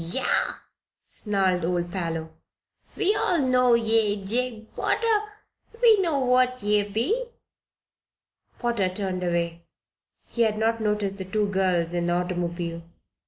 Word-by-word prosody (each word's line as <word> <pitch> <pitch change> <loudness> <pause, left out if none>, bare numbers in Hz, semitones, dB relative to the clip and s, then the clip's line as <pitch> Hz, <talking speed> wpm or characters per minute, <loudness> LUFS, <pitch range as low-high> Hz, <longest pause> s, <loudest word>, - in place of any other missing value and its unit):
"Yah!" 215 +11 0 0.5
snarled 190 -4 0
old 175 0 -1
Parloe. 165 -3 -3 0.6
"We 415 0 +2
all 355 - +1
know 250 -2 +4
ye, 225 -2 +2
Jabe 230 +1 -2
Potter. 430 -2 +1 0.5
We 450 -4 +6
know 330 -6 +1
what 255 -1 +2
ye 210 0 +3
be." 355 - 0 1.3
Potter 235 -6 0
turned 185 -1 -3
away. 170 -1 -1 0.7
He 235 - -3
had 220 -2 +2
not 225 +1 0
noticed 210 -2 -1
the 190 - -4
two 210 +3 0
girls 180 -3 +1
in 175 0 -1
the 175 - +1
automobile. 175 -1 -2
210 Hz, 125 wpm, -25 LUFS, 180-250 Hz, 1.3 s, We